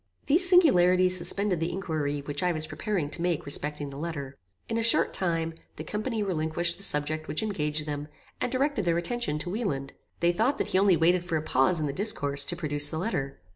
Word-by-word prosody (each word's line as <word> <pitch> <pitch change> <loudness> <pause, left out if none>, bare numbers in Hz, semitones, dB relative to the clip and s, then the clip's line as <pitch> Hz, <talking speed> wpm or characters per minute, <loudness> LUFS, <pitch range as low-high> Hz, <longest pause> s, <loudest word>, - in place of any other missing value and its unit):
These 355 +5 +4
singularities 185 - +5
suspended 185 +1 +2
the 165 - -1
inquiry 155 -6 -3
which 145 0 -4
I 180 -1 +2
was 155 -1 +1
preparing 155 -1 -3
to 170 - -2
make 175 -3 -1
respecting 145 0 +1
the 140 - -8
letter. 140 -4 -5 0.3
In 230 0 -1
a - - 0
short 230 0 +3
time, 165 -3 -1 0.2
the - - -6
company 215 +1 -3
relinquished 170 -2 -1
the 200 - -3
subject 155 -1 -1
which 150 +8 -2
engaged 150 -7 -2
them, 145 -1 -4 0.3
and - - -1
directed 270 -5 0
their 170 -1 +2
attention 230 -2 -2
to 165 +4 -4
Wieland. 145 - -3 0.3
They 170 0 +3
thought 225 +10 +1
that - - -2
he 185 - +2
only 195 -3 +4
waited 175 +2 +3
for 170 -2 -1
a 155 - -4
pause 155 +4 +2
in 155 - -1
the 140 - -3
discourse, 145 -8 -1
to 175 - -1
produce 145 -3 0
the 160 - -4
letter. 140 - -3
170 Hz, 215 wpm, -27 LUFS, 150-195 Hz, 0.3 s, singularities